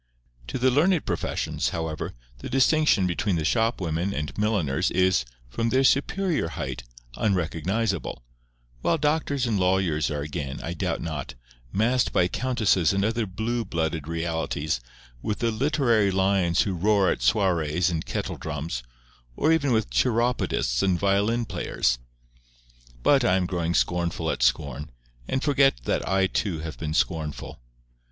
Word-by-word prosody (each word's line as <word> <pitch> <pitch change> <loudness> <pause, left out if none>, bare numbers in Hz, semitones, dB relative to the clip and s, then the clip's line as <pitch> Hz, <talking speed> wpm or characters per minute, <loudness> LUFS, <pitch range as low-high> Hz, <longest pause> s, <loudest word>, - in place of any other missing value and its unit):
To - - -3
the 130 +1 +3
learned 165 +5 +3
professions, - - -1
however, 80 -5 -4 0.2
the - - -7
distinction 135 -4 +3
between 95 +2 0
the 80 -2 -1
shopwomen 95 -5 0
and 75 0 -4
milliners 90 -7 +1
is, 90 -7 +2 0.2
from 115 - -1
their 130 +3 +3
superior 155 - +2
height, 80 - -5 0.4
unrecognizable; 95 - -1 0.6
while 165 - +2
doctors 150 -3 0
and 110 -4 0
lawyers 90 -5 +1
are 75 -1 -3
again, 70 -1 -5
I 85 - -3
doubt 85 - -2
not, 75 -7 -5 0.4
massed 120 +4 +2
by 90 - +3
countesses 110 -7 +1
and 100 +1 +1
other 115 0 0
blue 115 +5 -2
blooded 80 -5 -2
realities, 80 -5 -2 0.4
with 105 - -2
the 115 -1 0
literary 120 -4 +2
lions 95 -2 +2
who 100 - -2
roar 100 +2 +3
at - - -3
soirees 90 -4 +2
and 80 -2 -2
kettle - - -4
drums, 75 -4 -4 0.5
or 155 - +2
even 145 -4 +1
with 110 -2 +1
chiropodists 120 - +1
and 95 -2 +2
violin 100 +5 +1
players! 85 - -1 1.0
But 140 -3 +4
I 95 -6 +3
am 95 -1 +1
growing 85 -2 -1
scornful 85 -1 0
at - - -4
scorn, 70 +4 0 0.4
and 130 - -1
forget 140 - +3
that - - -1
I 95 0 +3
too 95 -3 -1
have 80 -1 -7
been 80 -1 -3
scornful. 75 -9 -2
95 Hz, 145 wpm, -25 LUFS, 80-115 Hz, 1.0 s, But